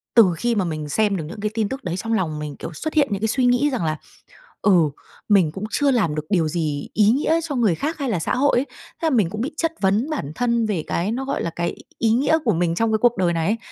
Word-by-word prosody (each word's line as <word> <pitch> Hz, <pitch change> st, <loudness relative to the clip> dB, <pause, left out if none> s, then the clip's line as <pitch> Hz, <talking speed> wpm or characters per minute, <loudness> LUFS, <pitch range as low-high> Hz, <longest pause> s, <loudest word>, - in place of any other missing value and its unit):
từ 210 Hz, -7 st, +7 dB
khi 235 Hz, +3 st, 0 dB
mà 195 Hz, -, +1 dB
mình 155 Hz, -3 st, -4 dB
xem 205 Hz, +3 st, +1 dB
được 160 Hz, -, -4 dB
những 210 Hz, +5 st, -9 dB
cái 210 Hz, 0 st, -2 dB
tin 220 Hz, -2 st, -1 dB
tức 270 Hz, +1 st, -6 dB
đấy 175 Hz, -1 st, -3 dB
trong 225 Hz, +4 st, -2 dB
lòng 155 Hz, -7 st, -1 dB
mình, 150 Hz, -2 st, -5 dB
kiểu, 170 Hz, -, -7 dB
xuất 315 Hz, -, -4 dB
hiện 295 Hz, -3 st, +3 dB
những 200 Hz, 0 st, -2 dB
cái 220 Hz, -, +1 dB
suy 250 Hz, +3 st, +1 dB
nghĩ 245 Hz, +4 st, +3 dB
rằng 210 Hz, -10 st, -1 dB
là, 155 Hz, 0 st, -1 dB, 0.6 s
ừ, 175 Hz, -7 st, +4 dB, 0.4 s
mình 190 Hz, -7 st, +4 dB
cũng 190 Hz, +5 st, -7 dB
chưa 285 Hz, -1 st, +2 dB
làm 200 Hz, -12 st, +1 dB
được 150 Hz, 0 st, -3 dB
điều 175 Hz, -6 st, +2 dB
gì 155 Hz, -3 st, -2 dB
ý 210 Hz, 0 st, +4 dB
nghĩa 300 Hz, +6 st, +2 dB
cho 300 Hz, -4 st, -4 dB
người 220 Hz, -8 st, +2 dB
khác 310 Hz, -, -3 dB
hay 275 Hz, -4 st, -2 dB
là 190 Hz, -, 0 dB
xã -, -, -1 dB
hội 280 Hz, 0 st, +3 dB
ấy. 270 Hz, -, -1 dB
Thế 330 Hz, -, -10 dB
là -, -, +4 dB
mình 220 Hz, -, +2 dB
cũng 215 Hz, +4 st, -5 dB
bị 285 Hz, +6 st, -3 dB
chất 330 Hz, 0 st, 0 dB
vấn 205 Hz, +9 st, +2 dB
bản 215 Hz, -, -3 dB
thân 235 Hz, -2 st, +1 dB
về 195 Hz, -7 st, -1 dB
cái 180 Hz, +5 st, -1 dB
nó 260 Hz, +3 st, -3 dB
gọi 275 Hz, -, -2 dB
là 170 Hz, -, -1 dB
cái 170 Hz, +1 st, -2 dB
y -, -, -10 dB
ý 225 Hz, -, +2 dB
nghĩa 270 Hz, +7 st, +3 dB
của 220 Hz, -, +3 dB
mình 170 Hz, 0 st, 0 dB
trong 225 Hz, +3 st, +1 dB
cái 220 Hz, -, +3 dB
cuộc 240 Hz, -2 st, +3 dB
đời 175 Hz, -2 st, +2 dB
này 165 Hz, -1 st, -1 dB
ấy. 215 Hz, +3 st, +1 dB
215 Hz, 295 wpm, -22 LUFS, 170-245 Hz, 0.6 s, từ